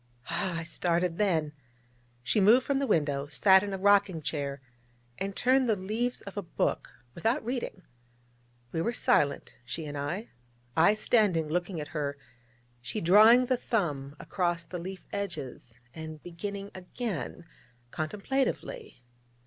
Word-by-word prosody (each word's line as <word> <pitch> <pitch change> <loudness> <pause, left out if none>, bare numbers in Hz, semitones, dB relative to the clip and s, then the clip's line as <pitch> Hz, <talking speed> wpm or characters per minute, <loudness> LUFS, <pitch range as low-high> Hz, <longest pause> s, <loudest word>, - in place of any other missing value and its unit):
Ah, 185 -2 -1
I 165 - -3
started 175 +1 0
then. 160 -7 +1 0.7
She 125 - +1
moved 225 +6 +6
from 280 -1 +1
the 275 - 0
window, 145 - +1
sat 190 +5 +5
in 205 0 -4
a 195 - -2
rocking 195 -4 +3
chair, 140 -2 -2 0.6
and 195 0 -3
turned 255 0 +3
the 220 - +4
leaves 220 +6 -2
of 200 0 -9
a 205 - -2
book, 175 - -1 0.2
without 225 - 0
reading. 240 -6 -4 0.9
We 165 - -1
were 235 +8 0
silent, 145 -9 +1
she 155 +6 -5
and 145 -1 -6
I; 155 +10 -3 0.5
I 170 +6 +5
standing, 205 -8 +2
looking 175 +1 -1
at 150 - -6
her, 145 -3 -3 0.6
she 120 -1 -4
drawing 215 +8 +7
the 255 0 +1
thumb 150 - -2
across 175 -3 -1
the 180 +1 -6
leaf 185 +2 -7
edges, 155 - -5 0.2
and 155 -1 -8
beginning 200 +4 -6
again, 185 -2 -5 0.5
contemplatively. 265 - -3
185 Hz, 140 wpm, -29 LUFS, 155-210 Hz, 0.9 s, drawing